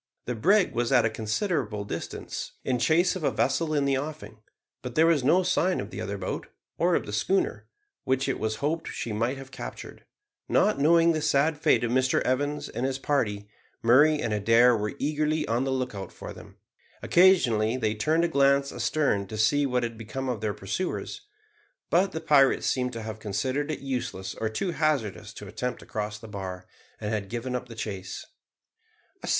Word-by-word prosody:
The 125 - -2
brig 185 - +3
was 120 +1 0
at 130 -3 +5
a 110 - +1
considerable 110 - -2
distance, - - -6
in 125 -2 0
chase 170 +9 +3
of 185 - -5
a - - +3
vessel 155 +4 0
in 145 -1 +2
the 135 -1 +2
offing; 115 -8 -7 0.4
but 125 -1 -7
there 160 - +5
was 165 -5 +3
no 175 +8 +4
sign 180 0 +1
of - - -6
the - - -6
other - - -4
boat, - - -4 0.3
or - - +3
of - - 0
the - - -7
schooner, 380 -2 0 0.4
which 130 +1 0
it 135 - -1
was 110 0 -1
hoped 160 +2 -1
she 115 - -4
might 115 +5 -1
have 135 0 -10
captured. - - -8 0.5
Not - - +3
knowing 165 +3 +5
the 155 -1 -1
sad 150 +3 +2
fate 155 -6 +3
of 120 - 0
Mr 130 +1 +2
Evans 145 +3 -1
and 120 - -5
his 135 0 0
party, 110 -8 -1 0.4
Murray 145 +6 +5
and 115 -5 -1
Adair 115 +4 +5
were 105 +3 -3
eagerly 150 +1 0
on 120 +3 0
the 135 - -1
lookout 125 -7 -3
for - - -9
them. - - -13 0.5
Occasionally 125 - +4
they 110 -4 0
turned 155 +10 +1
a - - +3
glance 140 -2 +3
astern 120 -11 0
to 110 - -6
see 145 +7 +3
what 125 -1 0
had 115 -1 -4
become 130 +4 -5
of 120 -4 -3
their 105 -2 -1
pursuers; 180 - -4 0.7
but 185 +3 +3
the 160 - -4
pirates 140 -4 +4
seemed 125 -1 0
to 115 -1 -5
have 110 0 -6
considered 130 +8 -2
it 155 - -3
useless 120 -8 -4
or 110 - -2
too 175 - -2
hazardous 150 - -1
to - - -9
attempt 125 -1 -4
to - - -13
cross 105 0 -4
the 115 - -11
bar, 95 -3 -6 0.3
and 105 +1 -3
had 100 -2 -3
given 120 +2 -3
up 125 0 -4
the 115 - -10
chase. 100 -4 -5
130 Hz, 195 wpm, -27 LUFS, 110-150 Hz, 0.7 s, at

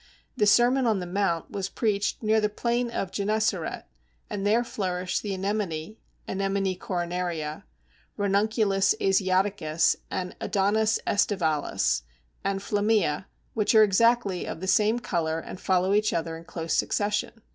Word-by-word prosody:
The 210 - +2
Sermon 245 +4 +4
on 215 -4 +2
the 180 - -4
Mount 175 -2 -1
was 195 -1 -3
preached 205 0 -1
near 220 0 +3
the 210 - +1
plain 235 +3 -1
of 195 -5 -3
Gennesaret, 205 -4 -1 0.5
and 205 0 -2
there 225 +3 +3
flourish 185 -5 -2
the 205 - -4
Anemone 195 -2 -3 0.3
(Anemone 195 -1 -1
coronaria), 175 -3 -3 0.5
Ranunculus 205 0 +2
asiaticus, 190 -4 +2
and 180 -1 -4
Adonis 215 +3 +2
aestivalis 160 - +1 0.4
and 195 0 -1
flammea, 205 -6 +1 0.3
which 220 0 +1
are 220 - +8
exactly 210 -2 +2
of - - -5
the 190 - -5
same 215 +4 +3
colour 165 -8 -1
and 180 - -9
follow 185 +1 +2
each 210 +1 +2
other 165 0 -2
in 165 +1 -11
close 165 -1 -4
succession. 210 0 0
195 Hz, 135 wpm, -26 LUFS, 180-215 Hz, 0.5 s, are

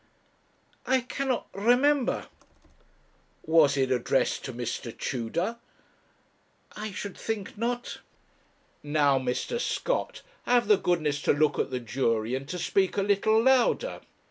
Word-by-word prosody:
'I 260 0 +3
cannot 255 +1 -2
remember.' 250 +6 +2 1.2
'Was 155 -3 +4
it 130 -1 +1
addressed 130 +1 +1
to 130 - -4
Mr. 120 -1 -5
Tudor?' 165 - -2 1.2
'I 210 0 -5
should 195 +1 -6
think 220 -4 -4
not.' 240 +3 -3 0.8
'Now, 145 -2 +2
Mr. 130 - -2
Scott, - - -2 0.2
have 245 -3 +3
the 210 -1 +6
goodness 155 -6 0
to - - +3
look 145 0 +1
at - - 0
the 130 -1 -3
jury, 115 -1 -1
and 135 +1 -4
to 180 - -3
speak 190 +3 0
a 200 - +2
little 215 +3 +3
louder. 265 - +2
180 Hz, 125 wpm, -27 LUFS, -, 1.2 s, the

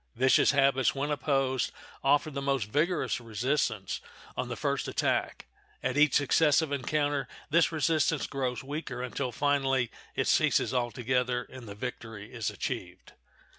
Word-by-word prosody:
Vicious 130 +2 +4
habits, 135 -1 +3
when 145 +2 -1
opposed, 135 -3 0 0.3
offer 145 +3 +3
the 140 -1 -4
most 135 -3 +1
vigorous 160 +3 +1
resistance 115 -3 -1 0.3
on - - -2
the - - -4
first - - -1
attack; - - -1 0.4
at 130 0 0
each 150 -1 +4
successive 150 +1 +3
encounter 145 +1 0 0.2
this 165 +1 +4
resistance 155 -1 +1
grows 130 -3 -3
weaker, 135 -3 -5
until, 125 +1 -3
finally, 135 -2 +1 0.2
it - - 0
ceases - - +3
altogether, 125 0 0
and 130 -3 -11
the 100 - -7
victory 115 -3 -7
is 115 -4 -2
achieved. - - -6
135 Hz, 135 wpm, -29 LUFS, 125-145 Hz, 0.4 s, Vicious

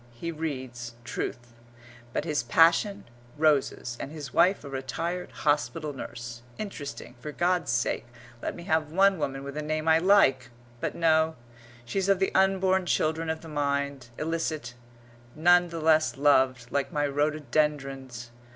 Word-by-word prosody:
He 170 +8 -5
reads 130 -7 -5
Truth. 120 0 -5 0.6
But 150 - -2
his 150 -3 0
passion? 170 +5 +3 0.3
Roses 145 -5 +1
and 140 - -5
his 150 -4 -8
wife 190 -1 +4
a - - -8
retired 165 +7 -3
hospital 150 +1 -1
nurse 120 -3 -7 0.2
interesting 155 -12 -6
for 150 - -6
God's 175 -3 +1
sake 120 0 0 0.3
let - - -3
me 170 - -9
have 160 -2 0
one 195 +1 +4
woman 135 -2 -3
with 140 0 -7
a 150 - -2
name 155 +1 -2
I 160 0 +6
like! 165 -9 +4 0.3
But - - -3
no; 160 -1 +3 0.5
she's 195 +9 -1
of 195 - +5
the 190 +1 0
unborn 190 -1 +3
children 160 0 0
of 160 0 -2
the 165 - -11
mind, 140 -3 -2
illicit, 155 -5 -2 0.6
none 175 +3 +5
the 165 0 -5
less 155 -6 +3
loved, 130 -4 +3
like 140 +3 -1
my 145 -3 0
rhododendrons. 140 -4 -1
150 Hz, 150 wpm, -27 LUFS, 135-165 Hz, 0.6 s, I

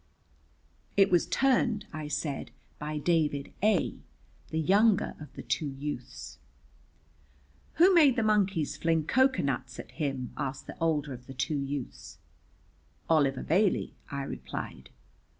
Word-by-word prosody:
"It 195 -1 +5
was 175 -2 +3
turned," 245 -5 +2
I 155 -1 -5
said, 150 -1 -3 0.3
"by 150 0 -4
David 150 -2 0
A, 210 -3 +2 0.5
the 160 - -3
younger 200 +6 +3
of 150 - -10
the - - -8
two 155 - -1
youths." 140 +2 -7 1.3
"Who 365 +3 +6
made 300 -7 +6
the 235 - +1
monkeys 195 -7 +1
fling 165 -2 +1
cocoa 260 +7 +3
nuts 130 -2 -2
at 115 - -9
him?" 135 -2 -3
asked 135 0 -4
the - - -9
older 150 -4 0
of 125 0 -11
the 135 - -9
two 145 +3 -1
youths. 140 -1 -5 0.9
"Oliver 140 -4 +3
Bailey," 190 +4 +1 0.2
I 140 -1 -3
replied. - - -7
155 Hz, 130 wpm, -29 LUFS, 140-200 Hz, 1.3 s, Who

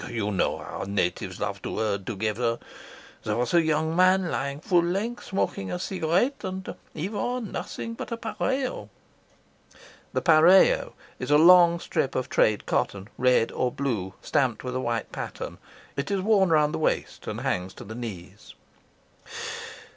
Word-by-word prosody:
You 110 -3 -2
know 95 - +1
how - - -6
natives 100 -3 -1
love - - -3
to - - -5
herd 100 -3 -1
together. 115 +2 -1 0.7
There 105 - -1
was 125 +4 -1
a 170 - +6
young 160 0 0
man 185 0 +4
lying 140 +1 -2
full 175 +2 +3
length, 200 +8 -2
smoking 95 - -2
a 90 - -2
cigarette, 190 - 0
and 190 -1 -4 0.2
he 160 +4 -3
wore 245 +4 -2
nothing 230 0 -5
but 230 - -7
a - - 0
." 230 -1 -7 1.7
The 180 - +5 0.3
is - - -4
a 145 - +6
long 170 +1 +7
strip 135 - -1
of 130 - -1
trade 105 -1 +2
cotton, 100 +1 -1
red 125 -2 +3
or 125 - 0
blue, 110 -10 -3
stamped 125 -5 0
with 125 0 -4
a - - 0
white 120 -2 -2
pattern. - - -6 0.4
It 140 0 -3
is 195 -1 0
worn 195 -2 +4
round 150 -2 +3
the - - -2
waist 155 - -1
and - - -4
hangs 90 +1 -2
to - - -9
the 110 - -8
knees. 105 -4 -8
150 Hz, 160 wpm, -26 LUFS, 110-185 Hz, 1.7 s, long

